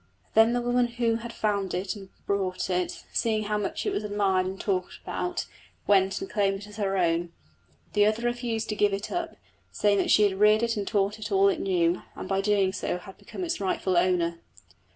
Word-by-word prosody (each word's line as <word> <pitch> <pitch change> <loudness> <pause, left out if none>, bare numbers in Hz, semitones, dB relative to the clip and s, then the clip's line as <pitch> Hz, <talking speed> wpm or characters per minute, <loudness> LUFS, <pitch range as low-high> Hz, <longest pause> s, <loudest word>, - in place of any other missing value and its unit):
Then 225 +1 +5
the 245 - +1
woman 245 0 +2
who 235 -1 0
had 230 +1 -7
found 200 -5 -1
and 195 +1 -4 0.2
brought 190 -2 -1
it, 180 0 -2
seeing 220 -2 +1
how 210 0 -1
much 205 - -3
it 410 - 0
was 215 - -2
admired 200 -3 +1
and 190 +1 -5
talked 185 -3 -2
about, 355 0 -3 0.4
went 195 -1 +3
and 385 - -5
claimed 195 - 0
it 205 - -10
as 210 - -12
her 195 -2 0
own. 170 -1 +1 0.6
The 205 0 +4
other 220 +2 0
refused 240 -2 -1
to 215 - -1
give 205 -1 +2
it 200 +1 -4
up, 345 -1 -3 0.4
saying 205 -1 +2
that - - 0
she 210 - +6
had 195 -2 +1
reared 210 +2 +5
it 230 0 +1
and 205 -2 -3
had - - -13
taught 205 0 +1
it 210 0 -6
all 195 0 +5
it - - -1
knew, 175 -2 +1
and - - -6
by 195 0 +1
doing 195 -2 +2
so 185 - -2
had 190 +2 -12
become 375 - -7
its 335 - -2
rightful 185 -1 0
owner. 175 -1 +2
205 Hz, 215 wpm, -27 LUFS, 190-225 Hz, 0.6 s, she